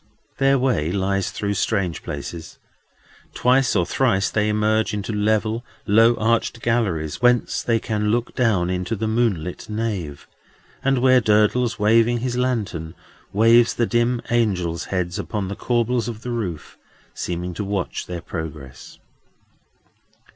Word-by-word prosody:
Their 135 0 +4
way 125 - 0
lies 95 0 0
through 100 -1 -2
strange 95 -3 -1
places. 85 -2 -7 0.8
Twice 130 0 +3
or 90 - +2
thrice 100 -6 +1
they 105 0 +1
emerge 110 +1 +1
into 105 +2 -4
level, 110 +2 0 0.2
low 115 +3 +5
arched 115 +1 0
galleries, 95 -10 -1
whence 125 -1 +2
they 115 -1 +1
can 105 -1 -1
look 120 +2 0
down 100 -8 +1
into 90 +4 -2
the 110 +1 -2
moon 110 -7 +1
lit 90 +4 -7
nave; 105 -10 -4 0.6
and 135 0 +2
where 130 -1 +6
Durdles, 110 +3 +2
waving 115 +3 +3
his 125 -1 -2
lantern, 105 -10 -2 0.4
waves 115 +3 +4
the 120 - +1
dim 120 +1 0
angels' 95 -8 0
heads 90 0 -2
upon 100 -1 -3
the 100 - -4
corbels 120 +1 0
of 115 -2 -6
the 125 - -4
roof, 95 -10 -5 0.3
seeming 90 0 -4
to 95 - -4
watch 100 -2 -3
their 90 -1 -5
progress. 75 -6 -8
110 Hz, 140 wpm, -22 LUFS, 95-120 Hz, 0.8 s, where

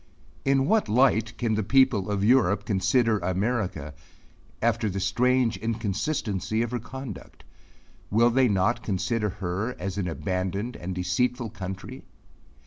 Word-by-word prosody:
In 135 -1 +3
what 220 +7 +2
light 115 -1 +2
can 115 -2 0
the 110 - +1
people 115 -3 +3
of 100 -1 -1
Europe 110 -4 +3
consider 105 +3 +2
America 95 - -2 0.7
after 115 -1 +1
the 100 0 -3
strange 120 +5 +2
inconsistency 110 - -1
of 120 - -4
her 125 - -2
conduct? 130 -1 -9 0.7
Will 115 +3 +4
they 130 +1 +4
not 105 +3 +1
consider 105 +1 -1
her 95 +6 -3
as 95 +2 -4
an 95 - -1
abandoned 95 +6 -3
and 90 +1 -5
deceitful 115 +7 -1
country? 95 -1 -7
110 Hz, 135 wpm, -26 LUFS, 95-120 Hz, 0.7 s, Will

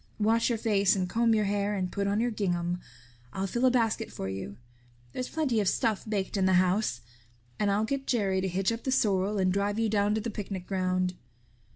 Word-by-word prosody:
Wash 225 +3 +3
your 235 - 0
face 205 -3 +2
and 185 -2 -1
comb 230 +4 +2
your 215 -1 +2
hair 205 +1 0
and 185 -2 -2
put 200 0 -1
on 200 +1 +1
your 240 +1 +1
gingham. 175 -4 -1 0.5
I'll 190 - -2
fill 240 +6 0
a - - +7
basket 230 -2 0
for 95 - -5
you. 95 +1 -6 0.6
There's 255 - -4
plenty 285 -8 0
of 205 - +1
stuff 220 -3 -1
baked 200 -1 -1
in 190 -1 +2
the 190 - +3
house. 180 - +2 0.6
And 205 - +2
I'll 205 +2 +2
get 275 +3 -3
Jerry 195 -6 +1
to 190 - -1
hitch 190 +3 0
up 230 0 -4
the 265 - -1
sorrel 205 -4 +1
and 185 -1 +2
drive 200 +1 0
you 225 -1 +1
down 205 0 +2
to 220 - -1
the 230 +1 -4
picnic 195 -3 -5
ground." 185 -1 0
205 Hz, 220 wpm, -28 LUFS, 190-225 Hz, 0.6 s, a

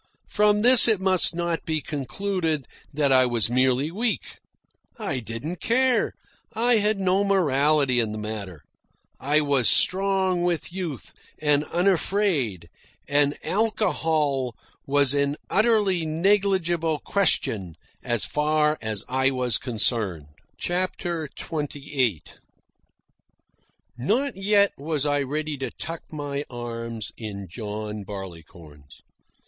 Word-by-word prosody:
From 210 0 +3
this 245 +1 +9
it 220 -4 +4
must 185 -3 +4
not 170 -1 -2
be 160 -1 -1
concluded 155 +2 -3 0.3
that 145 -1 0
I 130 -1 +5
was 120 -2 +1
merely 130 +4 +1
weak. 220 +5 -3 0.6
I 175 - -3
didn't 120 - -6
care. 255 +5 +2 0.4
I 235 +1 +3
had 210 0 +1
no 190 +1 +2
morality 150 -8 +2
in 110 -2 0
the 110 - -5
matter. 105 -6 -6 0.6
I 150 +3 +2
was 140 -5 +3
strong 190 -1 +3
with 175 -1 -2
youth, 175 -8 -6 0.2
and 150 -1 +1
unafraid, 175 - 0 0.4
and 145 0 +1
alcohol 160 - 0 0.3
was 140 -1 +3
an 140 0 0 0.2
utterly 210 -5 +2
negligible 175 -2 +1
question 110 - 0 0.3
so 120 -2 0
far 150 0 +1
as 110 -2 -4
I 130 +1 +1
was 125 -4 0
concerned. 105 - -1 0.3
CHAPTER 175 -2 -2
XXVIII 140 - -2 1.8
Not 245 - 0
yet 200 +1 +3
was 150 0 -2
I 145 -1 +1
ready 150 +2 -3
to 135 - -4
tuck 165 0 -7
my 145 -2 -4
arm 115 -2 -6 0.2
in 100 -4 -7
John 105 +2 -6
Barleycorn's. 85 -7 -11
150 Hz, 115 wpm, -24 LUFS, 120-185 Hz, 1.8 s, this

